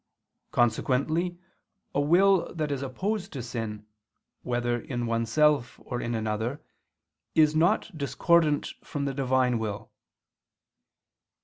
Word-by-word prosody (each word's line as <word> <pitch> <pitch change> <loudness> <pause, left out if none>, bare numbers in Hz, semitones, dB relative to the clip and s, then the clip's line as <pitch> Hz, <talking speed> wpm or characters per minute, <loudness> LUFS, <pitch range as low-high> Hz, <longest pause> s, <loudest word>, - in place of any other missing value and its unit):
Consequently 140 +9 +1 0.6
a 145 - +2
will 185 +5 +4
that 155 -3 -2
is 140 -2 -2
opposed 195 +9 -3
to 130 -4 -5
sin, 110 -3 -5 0.6
whether 120 -1 -1
in 120 -1 -4
oneself 120 +4 +2
or 120 -1 -4
in 120 0 -2
another, 110 +5 -2 0.8
is 155 -1 +5
not 170 +4 +2
discordant 155 +1 +2
from 145 -1 -3
the 140 - -1
Divine 130 -3 +1
will. 105 -3 -5
135 Hz, 110 wpm, -27 LUFS, 120-155 Hz, 0.8 s, is